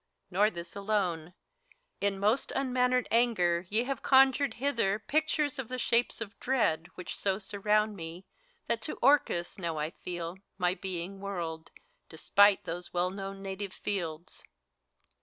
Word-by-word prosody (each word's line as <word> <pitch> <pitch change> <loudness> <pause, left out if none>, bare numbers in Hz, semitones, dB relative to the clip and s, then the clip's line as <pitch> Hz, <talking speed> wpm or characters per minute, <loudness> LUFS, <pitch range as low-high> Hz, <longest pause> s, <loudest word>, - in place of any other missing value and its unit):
Nor 205 +4 +4
this 170 -3 -8
alone: 185 -5 -1 0.6
in 200 -1 0
most 210 +7 +1
unmannered 250 -2 +2
anger 185 -7 +2
ye 220 +3 +2
Have 270 0 -3
conjured 270 +1 +5
hither 235 -7 +1
pictures 295 +3 0
of 260 - -3
the 255 - -4
shapes 235 0 +1
of 215 -1 -6
dread, 175 -11 +1
Which 180 - -6
so 195 -1 0
surround 210 +1 +1
me, 170 +1 -8 0.4
that 230 - -1
to 300 - -4
Orcus 245 -11 +3
now 170 -3 -2
I 155 +1 -2
feel 175 0 -6 0.2
My 180 -1 +2
being 190 0 -5
whirled, 170 -5 -4 0.4
despite 200 +5 +4
these 175 0 -6
well 180 +1 +1
known 195 0 -6
native 195 0 -5
fields. 170 -5 -4
200 Hz, 140 wpm, -30 LUFS, 175-235 Hz, 0.6 s, conjured